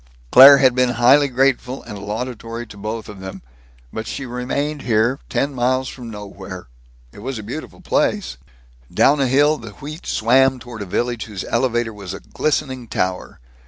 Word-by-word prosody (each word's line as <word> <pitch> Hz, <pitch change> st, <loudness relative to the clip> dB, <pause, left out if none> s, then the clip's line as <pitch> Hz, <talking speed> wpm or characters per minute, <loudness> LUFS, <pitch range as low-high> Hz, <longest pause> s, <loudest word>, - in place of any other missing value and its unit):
Claire 140 Hz, +2 st, +10 dB
had 130 Hz, -2 st, +4 dB
been 125 Hz, -1 st, +2 dB
highly 135 Hz, +4 st, +5 dB
grateful 130 Hz, 0 st, 0 dB
and 105 Hz, -3 st, -8 dB
laudatory 115 Hz, +2 st, -5 dB
to 105 Hz, -, -13 dB
both 110 Hz, +2 st, -5 dB
of 105 Hz, -2 st, -10 dB
them 95 Hz, -6 st, -8 dB, 0.5 s
but 110 Hz, 0 st, -5 dB
she 135 Hz, -, -5 dB
remained 135 Hz, +4 st, -3 dB
here, 120 Hz, +2 st, +1 dB
ten 140 Hz, +1 st, -1 dB
miles 130 Hz, +1 st, 0 dB
from 120 Hz, -2 st, -8 dB
nowhere. 100 Hz, -3 st, -9 dB, 0.5 s
It -, -, -14 dB
was 130 Hz, +3 st, -5 dB
a 110 Hz, -, -7 dB
beautiful 150 Hz, -, -8 dB
place. 205 Hz, -, 0 dB, 0.5 s
Down 140 Hz, +1 st, +3 dB
a 135 Hz, -, +2 dB
hill 145 Hz, +4 st, +3 dB
the 115 Hz, -3 st, -10 dB
wheat 150 Hz, -, -9 dB
swam 130 Hz, +3 st, +3 dB
toward 120 Hz, -3 st, -9 dB
a 100 Hz, -, -5 dB
village 120 Hz, +4 st, -2 dB
whose 105 Hz, -4 st, -6 dB
elevator 120 Hz, -2 st, 0 dB
was 100 Hz, -4 st, -7 dB
a -, -, -8 dB
glistening 130 Hz, -5 st, -2 dB
tower. 90 Hz, -3 st, -3 dB
125 Hz, 170 wpm, -20 LUFS, 110-135 Hz, 0.5 s, Claire